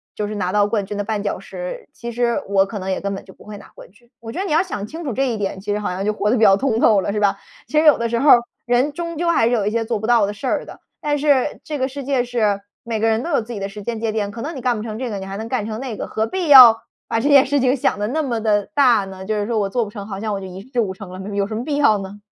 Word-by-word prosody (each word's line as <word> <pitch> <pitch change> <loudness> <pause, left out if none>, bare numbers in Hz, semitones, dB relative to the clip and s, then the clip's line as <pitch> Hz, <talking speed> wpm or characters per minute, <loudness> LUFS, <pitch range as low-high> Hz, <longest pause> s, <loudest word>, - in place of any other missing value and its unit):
就 210 - -2
是 210 - -5
拿 185 -3 -1
到 205 0 +3
冠 205 -1 -1
军 205 +2 -6
的 205 - -2
绊 210 -1 -3
脚 205 - -2
石， - - -7
其 235 0 -7
实 235 0 0
我 195 -1 +3
可 205 - -6
能 190 -1 -3
也 185 - -2
根 200 0 -2
本 - - -9
就 190 - -14
不 - - -18
会 210 -1 -8
拿 - - -13
冠 - - -14
军。” 235 +6 -26
我 225 -1 -7
觉 345 - -5
得 390 - -1
你 385 - -4
要 310 - +4
想 210 - -4
清 325 +10 -8
楚 280 - -3
这 270 +4 0
一 230 -3 -2
点， 195 -2 -3
其 205 +1 -3
实 210 - -1
好 210 - -2
像 185 +2 -3
就 210 - +1
活 210 0 -1
得 245 - +2
比 220 - +2
较 195 - +7
通 225 +1 0
透 210 -4 +4
了 200 - -2
是 210 - -2
吧？ 205 -1 +2 0.3
其 300 +6 +2
实 315 - +2
有 300 - +7
的 235 - -1
时 235 0 -1
候 285 - +3
儿 240 - +9 0.3
人 250 +5 +1
终 335 0 -5
究 345 +2 -1
还 330 -9 +3
是 - - +1
有 225 -5 +1
一 - - 0
些 230 0 0
做 225 -1 -2
不 220 - -4
到 235 -3 +4
的 205 - -4
事 260 +6 -6
儿 - - -1
的， - - -12 0.2
但 295 0 0
是 285 -1 +1
这 300 - -4
个 260 -1 0
世 280 +1 -7
界 270 -2 +1
是 220 -5 0 0.2
每 230 -1 -2
个 225 - +3
人 220 +1 +1
都 335 - -5
有 280 - +2
自 225 +2 -10
己 220 - -5
的 195 - -3
时 205 +1 -9
间 230 +1 -3
节 225 -1 -1
点， 205 -2 -2
可 230 - -8
能 310 +6 -5
你 265 - -6
干 245 -1 +1
不 210 - -5
成 220 -1 -5
这 250 +1 -3
个， 205 - -4
你 190 - -6
还 195 0 -6
能 220 +3 -6
干 250 -5 -1
成 220 +2 -5
那 245 -6 -5
个， - - -5
何 220 - -1
必 370 +2 -3
要 255 -6 +10 0.3
把 225 - +1
这 235 - 0
件 280 -2 +6
事 285 +1 +1
情 255 0 +2
想 245 - 0
得 210 - -1
那 310 +7 -1
么 240 -5 -2
地 210 -2 +1
大 245 -7 +4
呢？ 190 -1 -9
就 215 +2 -1
是 205 -1 -1
说 230 -2 0
我 200 - 0
做 240 +4 0
不 210 - -7
成， 205 -2 -8
好 195 -2 -6
像 215 -1 -2
我 200 - -2
就 195 - -8
一 185 +1 -9
事 250 - -1
无 200 -5 0
成 190 0 -10
了。 185 - -8
没 190 - -7
没 205 - -5
有 200 - +2
什 215 +2 -5
么 235 +3 -4
必 295 - -1
要 285 -8 +4
呢？ 200 +1 -8
225 Hz, 385 characters per minute, -20 LUFS, 205-255 Hz, 0.3 s, 要